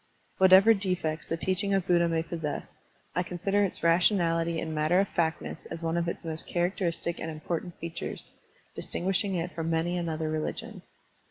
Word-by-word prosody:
Whatever 190 Hz, +4 st, +8 dB
defects 180 Hz, -6 st, -2 dB
the 165 Hz, -, -1 dB
teaching 190 Hz, +3 st, 0 dB
of 190 Hz, -2 st, 0 dB
Buddha 170 Hz, -1 st, +3 dB
may 165 Hz, -1 st, 0 dB
possess, 165 Hz, -3 st, -5 dB, 0.4 s
I 180 Hz, -, +1 dB
consider 195 Hz, +3 st, 0 dB
its 190 Hz, -, -1 dB
rationality 170 Hz, -1 st, +3 dB
and 160 Hz, -1 st, -4 dB
matter 155 Hz, +4 st, +3 dB
of 200 Hz, -, +2 dB
factness 160 Hz, -1 st, -2 dB
as 165 Hz, 0 st, -7 dB
one 165 Hz, 0 st, 0 dB
of 170 Hz, 0 st, 0 dB
its 170 Hz, -, -4 dB
most 160 Hz, -1 st, -2 dB
characteristic 175 Hz, -1 st, -1 dB
and 160 Hz, -, -4 dB
important 165 Hz, +2 st, -4 dB
features, 165 Hz, 0 st, -6 dB, 0.4 s
distinguishing 195 Hz, +2 st, -1 dB
it 175 Hz, +1 st, -2 dB
from 165 Hz, -1 st, -3 dB
many 165 Hz, +2 st, 0 dB
another 160 Hz, -2 st, -2 dB
religion. 155 Hz, 0 st, -4 dB
170 Hz, 165 wpm, -28 LUFS, 165-185 Hz, 0.4 s, Whatever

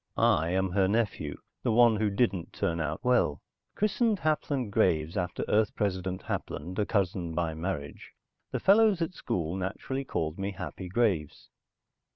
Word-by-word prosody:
I 80 Hz, +2 st, +3 dB
am 95 Hz, +1 st, 0 dB
her 95 Hz, 0 st, +3 dB
nephew, 100 Hz, -8 st, -1 dB, 0.2 s
the -, -, +1 dB
one 115 Hz, -1 st, +5 dB
who 105 Hz, 0 st, +1 dB
didn't 100 Hz, -4 st, 0 dB
turn 85 Hz, 0 st, -1 dB
out 75 Hz, 0 st, -3 dB
well. 125 Hz, -, +3 dB, 0.4 s
Christened 215 Hz, +1 st, +2 dB
Hapland 145 Hz, -, -1 dB
Graves, 85 Hz, -6 st, +2 dB
after 90 Hz, -3 st, -2 dB
Earth 105 Hz, 0 st, +2 dB
President 95 Hz, -2 st, -2 dB
Hapland, 90 Hz, +7 st, -4 dB
a 105 Hz, -, +1 dB
cousin 90 Hz, -5 st, -1 dB
by 85 Hz, -2 st, 0 dB
marriage, 80 Hz, -3 st, -5 dB, 0.4 s
the -, -, -2 dB
fellows 205 Hz, -3 st, +5 dB
at 165 Hz, -, -4 dB
school 85 Hz, -, -2 dB
naturally 100 Hz, +8 st, -3 dB
called 80 Hz, -, -3 dB
me 100 Hz, +1 st, -2 dB
Happy 90 Hz, 0 st, -6 dB
Graves. 95 Hz, -8 st, 0 dB
95 Hz, 155 wpm, -29 LUFS, 85-115 Hz, 0.4 s, one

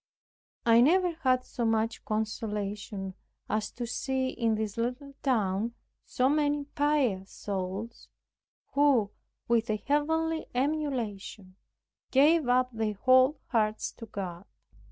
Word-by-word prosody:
I 230 Hz, 0 st, +6 dB
never 355 Hz, +7 st, +4 dB
had 260 Hz, -6 st, +1 dB
so 240 Hz, -, -4 dB
much 225 Hz, 0 st, 0 dB
consolation 210 Hz, -2 st, -3 dB, 0.3 s
as 215 Hz, 0 st, -1 dB
to 240 Hz, -, -4 dB
see 260 Hz, +2 st, -1 dB
in 230 Hz, -3 st, 0 dB
this 215 Hz, -1 st, -3 dB
little 250 Hz, +4 st, -3 dB
town 225 Hz, -3 st, 0 dB, 0.3 s
so 255 Hz, -, +1 dB
many 290 Hz, 0 st, +1 dB
pious 280 Hz, -10 st, 0 dB
souls 200 Hz, +3 st, -5 dB, 0.6 s
who 275 Hz, -8 st, +3 dB, 0.4 s
with 235 Hz, -1 st, +2 dB
a 215 Hz, -, +1 dB
heavenly 320 Hz, +6 st, 0 dB
emulation 245 Hz, -9 st, -2 dB, 0.5 s
gave 295 Hz, +2 st, +4 dB
up 250 Hz, 0 st, +3 dB
their 220 Hz, -2 st, -1 dB
whole 255 Hz, +6 st, +4 dB
hearts 215 Hz, -3 st, 0 dB
to 230 Hz, -, -11 dB
God. 185 Hz, -3 st, -6 dB
235 Hz, 115 wpm, -29 LUFS, 215-280 Hz, 0.6 s, I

